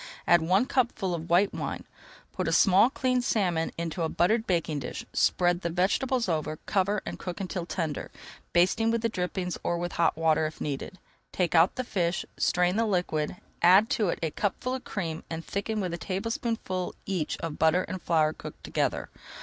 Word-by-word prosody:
Add 175 -1 +5
one 185 +8 +3
cupful 235 -8 0
of 170 0 -5
white 180 +4 +4
wine, - - -4 0.5
put - - -2
a - - +1
small 195 +4 +5
cleaned 255 -2 0
salmon 180 -9 +1
into 170 +1 -3
a 160 - +1
buttered 220 +8 +2
baking 165 -4 0
dish, 125 - -6
spread 175 0 +2
the 170 - -1
vegetables 220 +8 +1
over, 155 -2 -1
cover, 200 0 +1
and - - -6
cook 180 -2 -5
until 185 -2 -4
tender, 160 -6 -3 0.4
basting 190 +6 +3
with 230 0 0
the 230 - +2
drippings 180 -2 -3
or 175 - 0
with 175 0 -3
hot 165 -2 +1
water 160 -1 +2
if 155 - -10
needed. 145 +6 -4 0.3
Take 180 -2 0
out 170 +2 +5
the 255 - -2
fish, 175 -7 -1
strain 180 +2 +2
the 230 - +2
liquid, 175 -5 0 0.3
add 190 +5 +6
to 210 -5 +1
it - - -1
a 160 - 0
cupful 205 - -2
of 260 - -4
cream 165 -6 -4
and 165 0 -5
thicken 215 +2 -2
with 180 -4 -2
a 170 - -4
tablespoonful 195 -1 -3
each 185 -6 -2
of 165 -2 -5
butter 160 +4 +4
and 185 -1 -6
flour 155 -2 +2
cooked - - -10
together. - - -1
180 Hz, 190 wpm, -28 LUFS, 165-205 Hz, 0.5 s, add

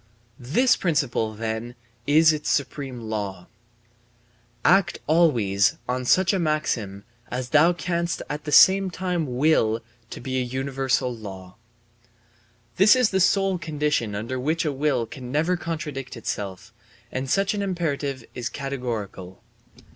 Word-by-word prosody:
This 190 - +3
principle, 120 - 0
then, 115 +2 -4 0.3
is 155 +2 +6
its 150 0 -3
supreme 135 -3 -2
law: 100 -5 -4 1.2
"Act 195 0 +4
always 115 - +3
on 125 +1 -2
such 185 +8 +3
a 195 - +1
maxim 120 - -1 0.3
as 125 0 -4
thou 155 +5 +5
canst 170 -1 -2
at 150 0 -5
the 150 - -4
same 190 +6 +7
time 175 -7 -3
will 125 -7 +3 0.3
to - - -8
be 130 +1 -2
a - - 0
universal 130 0 -1
law"; 95 -4 -10 1.2
this 205 +6 +7
is 250 -4 +2
the 190 - +1
sole 190 0 +2
condition 150 -8 -1
under 115 +5 -4
which 155 +5 0
a 150 - +1
will 140 -4 0
can 125 +2 -9
never 160 +6 +1
contradict 155 -7 -5
itself; 100 -4 -5 0.4
and 130 +1 -3
such 195 +4 +2
an 205 - -2
imperative 145 -9 -2
is 125 -1 -4
categorical. 115 -9 -5
140 Hz, 135 wpm, -24 LUFS, 115-165 Hz, 1.2 s, same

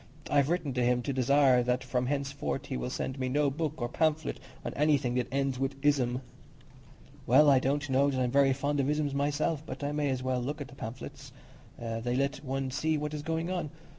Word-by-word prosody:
I've 145 -1 +3
written 165 -6 0
to 125 0 +1
him 125 0 +2
to 140 - -2
desire 130 0 +4
that 125 +1 0
from 125 0 -1
henceforth 140 - -2
he - - -4
will 60 0 -3
send 130 +1 -4
me 130 -1 -1
no 145 +1 +2
book 155 +1 -2
or 120 - -1
pamphlet 155 +4 0 0.3
on - - -3
anything 145 -4 +2
that 125 -1 0
ends 135 -1 0
in 135 +1 0
ism." 130 -4 +2 1.1
"Well, 145 +4 +7
I 135 - +6
don't 145 +3 0
know 135 +1 +3
that 130 -2 -1
I'm 125 -1 +1
very 140 0 +5
fond 140 +2 0
of 135 0 +1
isms 150 -1 0
myself; 145 +2 0
but 155 - -7
I 145 - -1
may 150 -1 0
as 130 -1 -2
well 130 -1 0
look 145 +5 -3
at 145 -1 -6
the 140 - -13
pamphlets; 125 -1 -8 0.5
they 115 +1 -3
let 140 +2 -1
one 135 -1 -2
see 155 +4 0
what 150 0 -3
is 150 - -3
going 165 +3 -2
on. 175 -5 -2
140 Hz, 220 wpm, -30 LUFS, 130-145 Hz, 1.1 s, Well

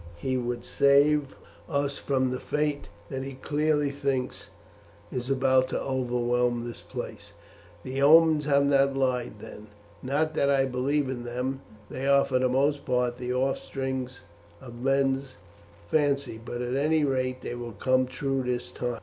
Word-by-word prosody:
He 130 +9 -2
would 120 -1 -3
save 140 0 +3 0.3
us 140 -2 -1
from 130 -2 0
the 130 - -3
fate 150 -1 -1 0.2
that 135 -1 -4
he 135 0 -6
clearly 150 +1 0
thinks 140 -2 -2 0.6
is 125 +1 -4
about 130 -1 +3
to - - -1
overwhelm 125 -2 0
this 120 - -8
place. - - -8 0.5
The 130 +1 -3
omens 155 +1 +6
have 140 -1 +3
not 140 -1 +3
lied 130 -2 0
then 105 +1 -11 0.3
not 150 +4 0
that 140 - +2
I 135 -1 +3
believe 135 +3 0
in 125 -2 -4
them; 125 +3 -3 0.3
they 135 +1 -4
are 140 0 +5
for 130 -2 +1
the 130 0 +2
most 140 +3 +1
part 125 0 0
the 125 0 -3
offspring 130 0 -2 0.5
of 120 -2 -11
men's 135 0 +1 0.5
fancy, 140 - 0
but 120 +1 -4
at 125 +1 -3
any 155 +3 +2
rate 130 -2 -1
they - - -4
will 120 -1 -6
come 130 +3 +2
true 135 +1 -2
this 125 -1 -3
time. 120 -1 -3
135 Hz, 160 wpm, -27 LUFS, 125-140 Hz, 0.6 s, omens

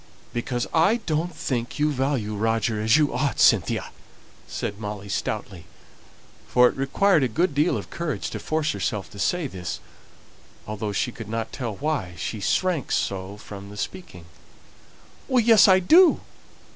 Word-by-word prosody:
"Because 120 0 -2
I 165 +7 +4
don't 160 +3 -1
think 120 -3 -3
you 150 0 +2
value 130 -6 -1
Roger 110 0 0
as 110 +5 +4
you 150 -4 +2
ought, 130 -1 -1
Cynthia!" - - +3 0.6
said 100 0 -4
Molly 105 -2 -6
stoutly, 100 -5 -4 0.8
for 125 0 +5
it - - -2
required 155 +6 +2
a 130 - +2
good 165 +8 0
deal 150 +5 +2
of - - -8
courage 155 - -3
to - - -5
force 155 0 -1
herself 105 -6 -3
to 100 - -11
say 175 - 0
this, 95 -9 -5 0.9
although 105 0 -4
she 125 +5 -1
could 115 -3 -9
not 115 0 -3
tell 120 -6 -4
why 140 - -2
she 105 +5 -4
shrank 160 - 0
so 95 +1 -2
from 100 -1 -10
speaking. 105 - -7 1.2
"Yes, 225 -4 +7
I 190 -1 +7
do! 325 - +6
120 Hz, 150 wpm, -24 LUFS, 105-155 Hz, 1.2 s, Yes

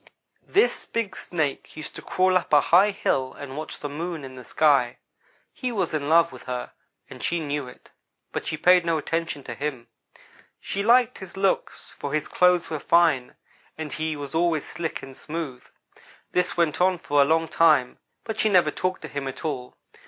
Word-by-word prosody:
"This 420 +5 +2
big 215 -5 -2
Snake 155 -5 -3
used 155 - -7
to - - -7
crawl 185 0 +2
up 185 - +1
a 145 - +9
high 180 +7 +5
hill 130 -9 -1
and 140 -2 -8
watch 155 +1 -6
the 145 - -3
Moon 160 +2 -5
in 130 -1 -8
the 130 -1 -10
sky. 135 -4 +3 0.6
He 255 -2 -3
was 190 -8 -1
in 145 -1 -1
love 170 +1 +5
with - - -11
her, 125 -1 -4 0.4
and - - -11
she 170 - 0
knew 145 -3 -3
it; 125 - -15 0.4
but - - -4
she 155 - -2
paid 180 +2 +5
no 165 -1 +1
attention 165 -1 -2
to 120 - -6
him. 130 -3 -5 0.7
She 200 - -3
liked 240 +3 +4
his 190 -1 -10
looks, 195 -1 -1
for 145 +1 -2
his 155 - -1
clothes 180 -1 +3
were 155 - -4
fine, 160 -6 +3 0.4
and 155 -2 -5
he 155 0 -2
was 145 -2 -7
always 165 -2 +1
slick 165 -2 -4
and 135 -1 -10
smooth. 150 -6 -6 0.7
This 180 0 0
went 170 -1 +1
on 185 0 +4
for 145 -3 +2
a - - +6
long 160 +2 +2
time, 155 -7 +3 0.2
but 220 -2 -5
she 215 - +3
never 185 -4 +4
talked 185 0 -2
to - - -5
him 140 -1 -4
at 135 +5 -7
all. 125 -5 -4
160 Hz, 195 wpm, -25 LUFS, 140-180 Hz, 0.7 s, a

